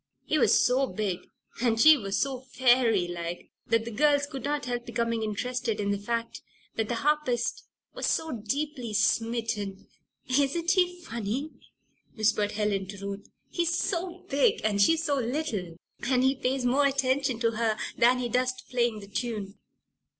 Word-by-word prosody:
He 310 - +1
was - - +5
so 260 +2 +3
big 200 -6 -2 0.4
and 230 -2 +2
she 310 +4 +9
was 200 -7 -2
so 270 -2 -1
fairy 245 -6 +3
like, 175 0 -6 0.2
that 230 0 +2
the 235 - -5
girls 285 +4 +3
could 270 -3 -7
not 290 0 -1
help 245 -1 -2
becoming 230 -1 -1
interested 225 +1 -2
in 200 -1 0
the 200 - -1
fact 230 +2 -3 0.3
that 225 -1 -1
the 240 - 0
harpist 295 -6 0 0.3
was - - -2
so 320 0 0
deeply 250 0 -3
"smitten." 220 -2 0 0.4
"Isn't 285 +6 +2
he 360 -2 +2
funny?" 235 +4 -3 0.6
whispered 215 -2 +1
Helen 205 -2 -1
to 200 +1 -8
Ruth. 200 0 -6 0.2
"He's 340 -1 0
so 360 0 -2
big 280 +1 +2
and 205 -2 +2
she's 325 +9 +4
so 285 -3 +1
little. 230 - -3 0.3
And 250 +1 +2
he 265 +1 +4
pays 265 -1 -1
more 275 +3 +4
attention 270 -2 0
to 230 -1 +3
her 225 -1 0 0.2
than 245 +2 +4
he 250 -1 -1
does 250 +1 +1
to 255 - -13
playing 235 -3 0
the 200 - -11
tune." 210 -2 -4
240 Hz, 165 wpm, -28 LUFS, 215-275 Hz, 0.6 s, she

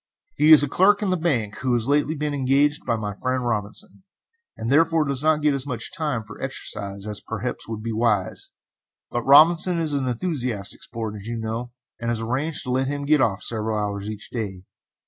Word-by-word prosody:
He 155 - +4
is 150 -2 +10
a - - +1
clerk 200 +8 +3
in 190 -3 +1
a - - +2
bank, 130 - -1
who 130 -2 0
has 120 0 +1
lately 145 +2 +2
been 150 0 -2
engaged 140 +2 +1
by 120 - +2
my 105 -2 -4
friend 130 -1 -1
Robinson, 120 - -3 0.6
and 115 +3 -3
therefore 165 +1 +3
does 140 -2 -2
not 155 -1 +2
get 150 -1 +3
as 140 0 -1
much 120 -4 -4
time 150 -10 -2
for 105 -1 -12
exercise 100 -6 -3
as 105 -1 -1
perhaps 120 +3 -5
would 110 -1 -6
be 115 - -3
wise, 110 -4 0 0.6
but 120 - -1
Robinson 165 +6 +6
is 160 -3 0
an 135 -2 0
enthusiastic 125 - -2
sport, 110 -2 -6
as 100 - -10
you 115 0 -3
know, 115 +2 -4 0.3
and 115 - -3
has 120 -1 0
arranged 135 +7 -1
to 125 - -4
let 130 +1 +1
him 145 0 -3
get 150 -1 +4
off 100 -6 0
several 110 -1 -1
hours 100 0 -3
each 105 -1 -7
day. 100 -6 -5
125 Hz, 205 wpm, -23 LUFS, 110-150 Hz, 0.6 s, is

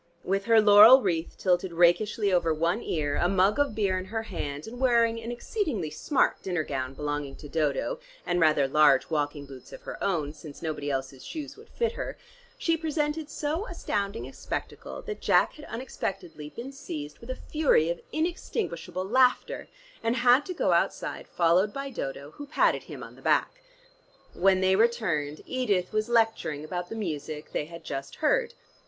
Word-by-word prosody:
With 195 +1 -1
her 230 -1 +6
laurel 215 +5 +9
wreath 170 -4 -1
tilted 180 -1 +1
rakishly 195 +4 +3
over 170 -2 +3
one 165 +3 0
ear, 145 -3 -1
a 175 - +2
mug 195 +5 +3
of 285 -6 +1
beer 195 -4 +1
in 185 - -6
her 220 +3 -3
hand, 145 -8 -5
and 245 +2 -9
wearing 235 -3 +3
an 230 +1 -5
exceedingly 240 - -2
smart 260 - +1
dinner 175 -4 -1
gown 135 -2 -4
belonging 145 -1 -3
to 150 - -10
Dodo, 155 - -1 0.3
and 175 - 0
rather 155 -4 +4
large 145 0 +4
walking 145 -1 -1
boots 135 -2 -12
of - - -11
her - - -7
own, 155 -7 0
since 155 0 -11
nobody 155 -3 -3
else's 135 -1 -3
shoes 305 -3 -6
would 440 - -16
fit 470 -1 -1
her, 475 - -5 0.4
she 330 - +1
presented 310 -1 -2
so 310 +8 -2
astounding 205 - -3
a - - -12
spectacle, - - -6
that 430 -2 -6
Jack - - +3
had 300 - -11
unexpectedly 190 - -5
been 240 - -8
seized 150 - -7
with 235 - -13
a 255 - -2
fury 265 - +2
of 170 - -5
inextinguishable 295 - -3
laughter, 250 +4 +2 0.3
and 230 +1 0
had 250 +3 +4
to 365 - -3
go - - +1
outside - - 0
followed 180 +4 +3
by 275 +3 -5
Dodo 140 - -5
who 290 - -9
patted 300 - +2
him - - -8
on - - -11
the - - -16
back. - - +1 0.7
When 190 +1 +3
they 190 0 +4
returned, 185 -10 +1
Edith 205 -9 0
was 215 +2 0
lecturing 225 -10 +1
about 175 +2 -4
the - - -5
music 155 -6 -5
they - - -2
had 170 +1 -11
just 135 0 -5
heard. - - +1
190 Hz, 180 wpm, -27 LUFS, 155-245 Hz, 0.7 s, laurel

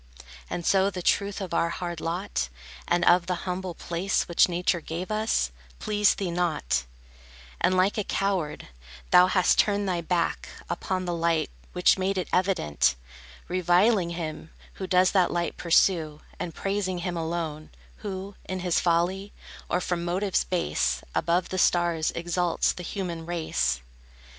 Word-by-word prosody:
And 175 - -4
so 195 0 +4
the 180 -2 -6
truth 200 +2 +1
of 185 -3 -5
our 170 - +2
hard 175 -1 -4
lot, 165 - -2 0.4
And 175 0 +2
of 175 0 +5
the 180 0 -3
humble 180 -1 -3
place 175 +3 -1
Which 170 +1 +4
Nature 175 0 0
gave 170 +5 -5
us, 215 - +1 0.3
pleased 210 -1 +2
thee 190 -3 -2
not; 155 - 0 0.7
And 185 +1 +2
like 190 +4 +2
a - - 0
coward, 190 - -2 0.4
thou 180 0 +8
hast 185 -1 +3
turned 205 -1 +2
thy 175 -2 0
back 170 0 -1 0.2
Upon 185 +1 -2
the 175 - -1
light, 165 -2 0 0.2
which 180 +1 +4
made 190 +1 0
it 185 - -2
evident; 180 - +2 0.5
Reviling 180 +2 +3
him 160 -2 -5 0.2
who 190 - -6
does 185 0 +4
that 185 -3 +3
light 170 -1 -1
pursue, 165 -3 +2 0.2
And 170 - -5
praising 195 -2 -1
him 180 -1 -2
alone 160 -2 -3 0.3
Who, 195 -1 -6
in 185 -1 -4
his 180 -2 +2
folly, 180 +4 0 0.4
or 180 - +1
from 175 -1 -2
motives 185 +3 0
base, 180 -2 0
Above 175 +1 +1
the 185 - -2
stars 170 -3 +2
exalts 175 0 +1
the - - -8
human 175 -3 -4
race. 165 - -1
180 Hz, 155 wpm, -26 LUFS, 170-190 Hz, 0.7 s, thou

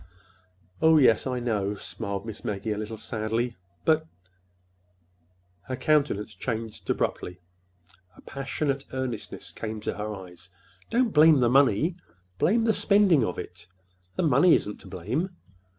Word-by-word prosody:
"Oh, 160 0 +6
yes, 125 -4 +4
I 125 -1 -1
know," 105 -4 -1
smiled 100 -1 -5
Miss 110 -2 -7
Maggie, 105 +1 -3
a 105 - -1
little 110 +1 -5
sadly. 115 +2 -2 0.3
"But—" 160 0 +3 1.6
Her 130 - -2
countenance 140 -8 +1
changed 110 -1 -5
abruptly. 90 0 -2 0.8
A - - -14
passionate 140 0 -3
earnestness 130 -5 -5
came 110 -1 -5
to - - -3
her 105 0 -3
eyes. 90 -1 -11 0.4
"Don't 235 -1 +1
blame 155 -1 +7
the 120 -2 +3
money—blame 140 - +1
the 225 -1 +3
spending 200 - +4
of 90 - -2
it! - - -8 0.5
The - - 0
money 155 +3 +5
isn't 105 - -3
to - - -13
blame. 145 - -3
120 Hz, 135 wpm, -26 LUFS, 105-155 Hz, 1.6 s, blame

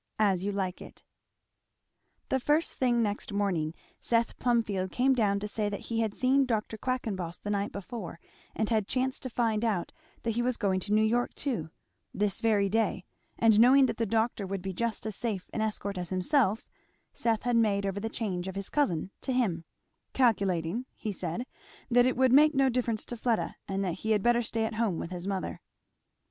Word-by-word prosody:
As 195 -4 +2
You 205 - 0
Like 190 -2 -3
It. - - -12 1.3
The 265 - +2
first 295 +5 +1
thing 240 -2 +2
next 205 0 -2
morning 180 -6 0 0.2
Seth 230 -1 +1
Plumfield 210 -6 +1
came 265 +2 +3
down 205 -5 +2
to 210 - -4
say 210 0 -1
that 200 - -4
he 230 - +1
had 220 -2 0
seen 265 +1 +3
Dr. 220 -2 -1
Quackenboss 210 -8 -3
the 205 - -5
night 200 0 -1
before 200 -4 -7 0.4
and 220 - 0
had 215 -4 +1
chanced 260 0 -1
to 255 - -4
find 225 -2 0
out 205 -7 0 0.3
that 230 - 0
he 235 +2 0
was 250 0 0
going 190 -3 +1
to 200 +3 -6
New 215 +1 +4
York 240 +3 +1
too, 230 - -2 0.5
this 205 -1 0
very 210 -3 +3
day; 210 -2 0 0.3
and 220 -2 +5
knowing 265 +4 +7
that - - -2
the 230 - 0
doctor 220 -1 0
would 195 -1 -4
be 190 -1 -3
just 230 +3 -2
as 215 -2 -3
safe 210 -6 -3
an 220 - -1
escort 200 -3 -2
as 175 -1 -4
himself, 210 +3 +1 0.5
Seth 225 -2 0
had 245 -1 +1
made 205 -3 +2
over 195 0 -2
the 225 +2 -3
charge 190 -6 -3
of 190 - -5
his 195 0 -5
cousin 185 - 0
to 265 - -2
him; 200 -10 0 0.5
"calculating," 200 -2 +1
he 215 - -4
said, 185 +5 -3 0.5
"that 245 +1 +5
it 255 - 0
would 260 -1 +4
make 300 +2 +6
no 270 0 +4
difference 235 -3 -1
to 240 - -5
Fleda 230 -1 0
and 195 0 -1
that 175 - -3
he 220 - -4
had 205 -2 +1
better 240 0 +4
stay 225 -1 -1
at 220 - -3
home 215 -6 0
with 170 - -5
his 180 +1 -5
mother." 195 -2 -3
220 Hz, 200 wpm, -29 LUFS, 195-240 Hz, 1.3 s, knowing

